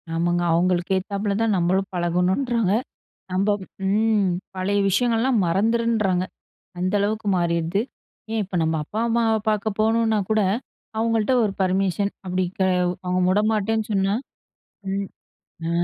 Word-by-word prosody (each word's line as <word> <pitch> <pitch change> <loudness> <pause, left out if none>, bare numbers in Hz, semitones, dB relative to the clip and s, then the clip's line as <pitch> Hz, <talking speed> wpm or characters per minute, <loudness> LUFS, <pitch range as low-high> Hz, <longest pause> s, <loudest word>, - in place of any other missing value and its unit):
ஆமாங்க. 175 +1 +1
அவங்களுக்கு 180 +2 +1
ஏத்தாப்பல 200 +1 -2
தான் 225 -3 +2
நம்மளும் 185 +2 +1
பழகணுன்றாங்க. 185 +6 +1 0.6
நம்ப 190 +3 +1 0.4
ம். 210 0 +2 0.3
பழைய 195 +2 0
விஷயங்கள்லாம் 235 +2 +2
மறந்துருன்றாங்க. 210 0 +1 0.6
அந்த 185 +2 -1
அளவுக்கு 210 +1 -1
மாறிருது. 170 +2 0 0.5
ஏன் 225 -1 0
இப்ப 190 -1 -7
நம்ம 160 0 +1
அப்பா, 210 +8 -5
அம்மாவ 230 -1 +2
பார்க்க 210 -1 -1
போகணுனா 220 0 +2
கூட, 215 0 +3 0.6
அவங்கள்ட்ட 225 +1 +1
ஒரு 205 -3 0
பர்மிஷன். 190 +1 +1
அப்படி 185 0 0
க - - +3 0.4
அவங்க 180 0 +1
வுடமாட்டேன்னு 215 +2 +1
சொன்னா 195 0 +2 0.8
ம். 195 0 -2 0.6
ஆ. - - -1
200 Hz, 120 wpm, -23 LUFS, 185-220 Hz, 0.8 s, கூட